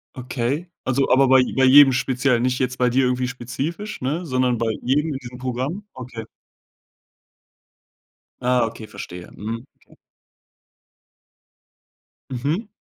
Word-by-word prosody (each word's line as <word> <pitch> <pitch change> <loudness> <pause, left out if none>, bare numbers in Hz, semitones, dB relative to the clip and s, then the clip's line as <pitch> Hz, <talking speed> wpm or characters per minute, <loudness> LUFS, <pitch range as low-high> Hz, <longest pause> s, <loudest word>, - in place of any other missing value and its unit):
Okay. 130 +6 -2 0.2
Also, 135 +1 +1
aber 135 +1 +5
bei 130 0 +6
bei 135 0 +4
jedem 140 +1 +8
speziell, 125 -1 +1
nicht 125 +1 0
jetzt 130 0 -1
bei 125 -1 +3
dir 130 +2 +2
irgendwie 125 0 0
spezifisch, 140 - -5
ne? 155 +7 -2
Sondern 130 -4 +1
bei 115 -1 0
jedem 150 +5 +1
in 135 - -3
diesem 125 -1 -10
Programm? 130 - -3
Okay. 120 -3 -8 2.2
Ah, 125 -1 +3
okay, 115 -1 -8
verstehe. 90 -4 -9
Mhm, 115 +4 -6 0.2
okay. - - -21 2.3
Mhm. 145 - -2
130 Hz, 125 wpm, -22 LUFS, 120-135 Hz, 2.3 s, jedem